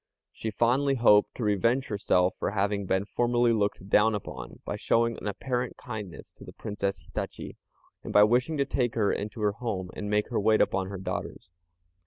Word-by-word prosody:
She 110 - -5
fondly 125 +6 +2
hoped 105 -4 +4
to 120 - -4
revenge 115 +6 +2
herself 95 -3 +2
for - - 0
having 100 0 -1
been 95 +2 +1
formerly 120 +1 +2
looked 100 -3 -1
down 105 +2 +4
upon, 105 - -7
by - - -3
showing 115 0 +1
an - - -6
apparent 125 +5 -3
kindness 105 -7 -8
to - - -15
the - - -11
Princess 100 -2 -3
Hitachi, - - -6 0.5
and - - -6
by 105 - +7
wishing 125 +8 +2
to 140 - +2
take 125 -4 -1
her 105 -3 +2
into 105 +2 -5
her 105 -1 +2
home, 100 -5 -4
and 105 - -4
make 105 +1 +1
her 120 - 0
wait 110 +1 +3
upon 95 -1 +1
her 100 0 -6
daughters. 95 - -5
105 Hz, 190 wpm, -28 LUFS, 100-120 Hz, 0.5 s, by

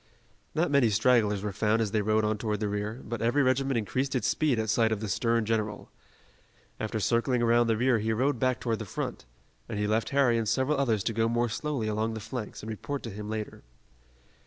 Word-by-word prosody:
Not 160 -1 +1
many 140 -5 +4
stragglers 105 -2 +3
were 105 - -2
found 105 +3 +1
as 110 -3 0
they 110 -1 +1
rode 110 +1 +2
on 105 0 0
toward 105 -2 -2
the 105 - -1
rear, 105 +4 -3
but 120 -2 -5
every 120 +5 +2
regiment 135 0 +1
increased 130 +5 -1
its 125 - +1
speed 150 -6 +1
at 110 0 -1
sight 110 +1 +2
of 110 - 0
the 110 - -4
stern 115 +3 +1
general. 110 -2 -2 0.9
After 110 0 -2
circling 120 +3 +1
around 120 0 +4
the 115 -1 +2
rear 125 0 +3
he 110 +2 -1
rode 130 +3 +1
back 130 0 +1
toward 115 -2 -1
the 110 - -5
front, 90 - -5 0.4
and - - -3
he 105 - 0
left 110 +2 0
Harry 130 -4 +3
and 110 -2 -1
several 140 +2 +1
others 115 -7 +1
to 115 - -1
go 115 +1 +1
more 120 +1 +1
slowly 135 -1 -2
along 110 +1 -1
the - - -4
flanks 110 0 -6
and 110 - -6
report 140 +6 -5
to 115 - -5
him 105 +1 -7
later. 110 -1 -5
115 Hz, 225 wpm, -28 LUFS, 105-125 Hz, 0.9 s, many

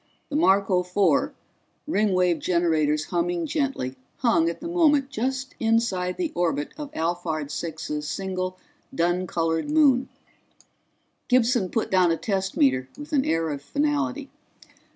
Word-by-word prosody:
The 290 - -4
Marco 195 - +3
Four, 180 -3 +1 0.5
Ringwave 185 - +2
generators 155 -4 +1
humming 175 0 0
gently, 270 - -2 0.2
hung 195 -9 +3
at 170 - -6
the 330 - -6
moment 300 -5 +3
just 265 +2 -2
inside 225 -6 +1
the 340 -4 -2
orbit 165 -4 -1
of 295 -2 -7
Alphard 160 -3 -2
Six's 150 -2 -4
single 185 -1 -3 0.4
dun 175 0 +1
colored 165 - -1
moon. 285 -4 +4 1.2
Gibson 240 -5 +3
put 225 - -2
down 185 -2 +4
a 165 - +1
test 195 -1 -2
meter 130 -2 +2
with 295 +1 -9
an 270 -2 +2
air 165 0 0
of 140 -1 -5
finality. 285 - -1
185 Hz, 130 wpm, -25 LUFS, 165-265 Hz, 1.2 s, moon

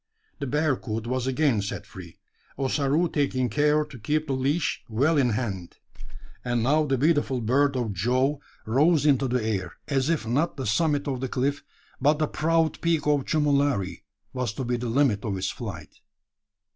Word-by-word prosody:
The 140 - -3
bearcoot 125 -6 -1
was 130 +1 -2
again 130 -4 +2
set 100 - -5
free 90 -4 -12 0.4
Ossaroo 140 +4 +1
taking 135 -5 0
care 150 +4 +2
to 140 -5 -12
keep 150 +8 0
the 140 - -2
leash 140 +5 0
well 140 +9 +2
in 135 -4 +3
hand; 105 -7 -3 0.7
and 120 -2 0
now 150 +5 +3
the 135 -1 +1
beautiful 145 -2 +2
bird 135 +5 +2
of 115 -5 -2
Jove 130 +9 +1 0.3
rose 145 +7 +3
into 135 -2 +3
the 125 -2 0
air, 95 -5 -2
as 135 0 0
if 165 -6 0
not 140 +10 0
the 135 - -4
summit 145 +6 +1
of 130 -3 -2
the 130 - -2
cliff, 140 +4 -1 0.4
but 150 +1 +4
the 155 - +1
proud 165 +1 0
peak 165 -3 +1
of 145 -2 +2
Chumulari, 140 - +1 0.3
was 125 -5 -2
to 130 - -4
be 125 0 -1
the 120 0 -3
limit 115 -5 +2
of 100 -4 -2
its 95 +1 -2
flight. - - -8
135 Hz, 175 wpm, -26 LUFS, 120-150 Hz, 0.7 s, but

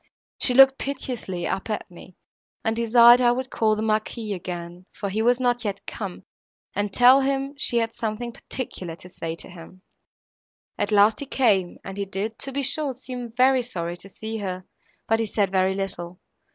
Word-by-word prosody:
She 250 - +2
looked 270 0 +7
piteously 245 -10 -4
up 195 - -3
at 210 -3 -4
me, 175 +1 -14 0.5
and 225 0 +1
desired 235 +1 +7
I 240 -1 +5
would 260 +1 -3
call 215 -1 +2
the 215 - -3
Marquis 215 0 -1
again, 175 0 -7
for 200 - -5
he 210 +3 -1
was 245 +2 +3
not 245 -1 +1
yet 200 -2 -4
come, 195 -5 -6 0.5
and 205 0 -1
tell 255 +5 +6
him 275 +1 -1
she 260 -4 0
had 230 -1 0
something 230 +1 -4
particular 185 -9 -6
to 175 - -14
say 165 -2 -5
to - - -5
him. 185 +1 -13 0.9
At - - -2
last, 210 +1 +5
he 285 - -5
came, 205 -10 +2
and 195 0 -8
he 200 - -2
did, 210 +3 -4
to 275 - -2
be 280 +1 -2
sure, 275 +1 +1
seem 250 -2 -7
very 255 +2 +4
sorry 175 -8 -4
to 195 - -11
see 220 +3 -6
her, 185 -2 -5 0.4
but 225 0 +2
he 225 - 0
said 200 -2 0
very 190 0 +2
little. 185 -2 -5
220 Hz, 190 wpm, -24 LUFS, 190-245 Hz, 0.9 s, looked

